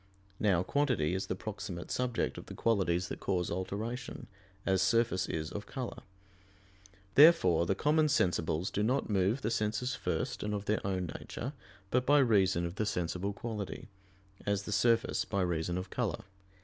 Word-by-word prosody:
Now 95 -5 +3
quantity 125 - +1
is 95 +1 -2
the - - -2
proximate 100 -3 -6
subject 125 -2 -1
of - - -12
the - - -8
qualities 95 -6 +1
that - - -5
cause 90 -3 -1
alteration, 110 +7 -4 0.4
as 95 -1 +2
surface 105 -1 +2
is 80 0 -3
of 105 - -6
color. 130 -3 -5 1.1
Therefore 100 - +6
the 100 - +2
common 155 +6 +3
sensibles 90 - +1
do 105 - -1
not 125 +2 +1
move 100 +6 +1
the 110 - 0
senses 110 +4 0
first - - -2
and 105 0 -1
of 100 0 -4
their 105 +1 +1
own 95 -2 -1
nature, 130 +5 -6 0.4
but 125 +1 +1
by 145 +1 +6
reason 95 -9 +3
of 85 +3 -5
the 110 - 0
sensible 90 +1 -1
quality; 105 +1 -5 0.5
as 100 -1 0
the 105 - -6
surface 115 +2 +2
by 100 -2 -1
reason 85 0 -1
of 90 +1 -5
color. 115 -10 -2
100 Hz, 165 wpm, -32 LUFS, 90-120 Hz, 1.1 s, Therefore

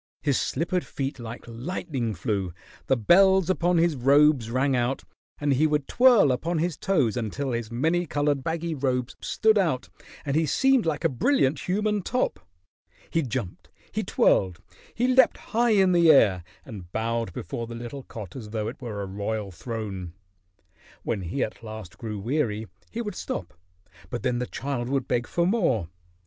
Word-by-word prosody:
His 140 -4 +2
slippered 175 +5 -1
feet 135 -1 -4
like 115 0 -7
lightning 120 - -3
flew; 95 -1 -2 0.3
the 135 - +3
bells 190 - +5
upon 175 -1 +1
his 165 -1 +3
robes 140 -1 +4
rang 130 +3 +1
out, 125 +2 0 0.4
and 145 -1 +2
he 150 +4 +3
would 150 -2 0
twirl 245 - +5
upon 160 +7 -1
his 170 0 0
toes 150 - +1
until 125 +4 -2
his 115 -2 -3
many 165 +8 +1
colored 145 -2 0
baggy 165 +1 -2
robes 130 -3 -1
stood 220 -1 +3
out 160 -10 0 0.4
and 140 -1 -1
he 160 0 +2
seemed 265 - +3
like 150 -2 -1
a - - +5
brilliant 140 - +1
human 210 +2 +1
top. 250 +7 -1 0.7
He 165 - +2
jumped, 120 - -5 0.2
he - - -1
twirled, 90 -3 +2 0.4
he 245 +2 +1
leaped 260 +1 +5
high 235 +1 0
in 190 -3 +4
the 170 -2 +5
air 100 - +5 0.2
and 95 -8 -10
bowed 115 -2 -1
before 115 +7 -5
the 115 - -7
little 120 +4 -6
cot 110 -7 -9
as 115 -5 -7
though 110 -1 -2
it 125 +4 -7
were 105 -5 -4
a - - -3
royal 100 +1 -3
throne. 95 -4 -6 0.9
When 105 -4 -2
he 95 +10 -2
at 110 - -5
last 110 -5 -9
grew 110 -2 -5
weary, 110 -1 -1 0.2
he 235 +1 -4
would 210 -3 -4
stop, 90 - -5 0.6
but 120 - -4
then 125 -2 0
the 125 - -2
child 130 -3 -3
would 135 -1 -1
beg 120 -1 0
for 170 - +1
more. 165 - +1
130 Hz, 175 wpm, -26 LUFS, 115-170 Hz, 0.9 s, bells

